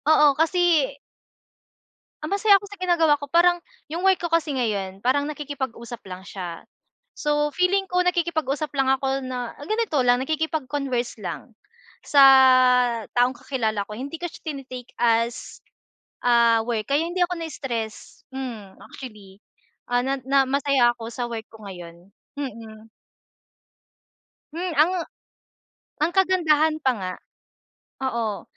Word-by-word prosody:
Oo 300 -2 +6
kasi 325 -3 +3 1.3
ah, 305 - -3
masaya 405 +1 +4
ako 405 - -11
sa 410 - -11
ginagawa 340 -5 +3
ko. 285 - -7
Parang 345 +4 +4 0.3
yung 340 +4 -3
work 380 -1 +4
ko 345 - -2
kasi 320 -3 +1
ngayon, 200 -6 -2
parang 265 +5 +1
nakikipag-usap 265 -6 -6
lang 185 -1 -8
siya. 180 -3 -7 0.6
So, 295 0 +1
feeling 385 +2 +1
ko 360 0 +1
nakikipag-usap 315 -4 0
lang 270 -1 +2
ako 270 0 -1
na, 250 -2 -5
ah, 290 - -10
ganito 435 -4 -1
lang, 245 +1 +4
nakikipag-converse 280 -5 -2
lang, 215 +5 -7 0.5
sa 285 - +5 1.0
taong 245 +1 +4
kakilala 220 -6 -2
ko. - - -6
Hindi 280 +6 -6
ko 350 - -3
siya - - -14
tine-take 255 -3 -9
as, 235 +1 0 0.6
ah, 235 -2 +4
work, 225 -3 -2
kaya 290 +4 +2
hindi 360 +1 -3
ako 360 0 -5
nai-stress. 240 -8 -6
Hmm, 235 -7 -7
actually, 210 -6 -11 0.5
ah, 245 0 +2
na 270 +1 0
na 270 0 +3
masaya 275 -3 +3
ako 230 -1 -8
sa 245 - -3
work 225 -2 -6
ko 220 -2 -14
ngayon. 175 -1 -11 0.3
Mm. 225 -5 -7 1.7
Hmm. 345 0 -3
Ang 310 +5 +4 1.1
ang 325 - +1
kagandahan 330 -5 +3
pa 260 - +4
nga 185 -1 -4 0.9
oo. 230 -5 -2
270 Hz, 135 wpm, -24 LUFS, 230-320 Hz, 1.7 s, Oo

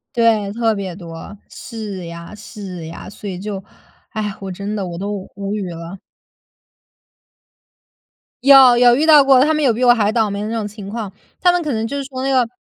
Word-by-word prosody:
对， 225 -4 +2
特 225 0 +1
别 195 -4 -5
多， 170 +2 -10
是 205 -6 -7
呀， 170 +2 -9
是 195 -5 -9
呀。 165 - -9
所 205 +1 -8
以 180 - -5
就， 195 0 -5 0.5
唉， 210 -2 -4
我 195 -1 -5
真 200 +3 -5
的 200 -3 -3
我 170 -1 -6
都 200 0 -5
无 200 0 -4
语 200 -4 -3
了。 170 +3 -8 2.4
有 265 -3 +8
有 245 0 +6
遇 295 +5 +1
到 305 -2 +8
过， 270 -2 +5
他 310 +2 +2
们 305 - 0
有 250 -5 +4
比 245 - -2
我 245 -1 +7
还 215 -3 +1
倒 225 -2 +2
霉 200 0 -4
的 210 - -3
那 230 - -3
种 220 - -2
情 205 -1 -9
况， 215 -2 -5 0.3
他 355 - +5
们 355 0 0
可 300 -5 -2
能 220 0 -1
就 280 +5 -4
是 280 - -3
说 260 -1 -6
那 270 - 0
个 255 -3 +3
210 Hz, 225 characters per minute, -19 LUFS, 195-245 Hz, 2.4 s, 有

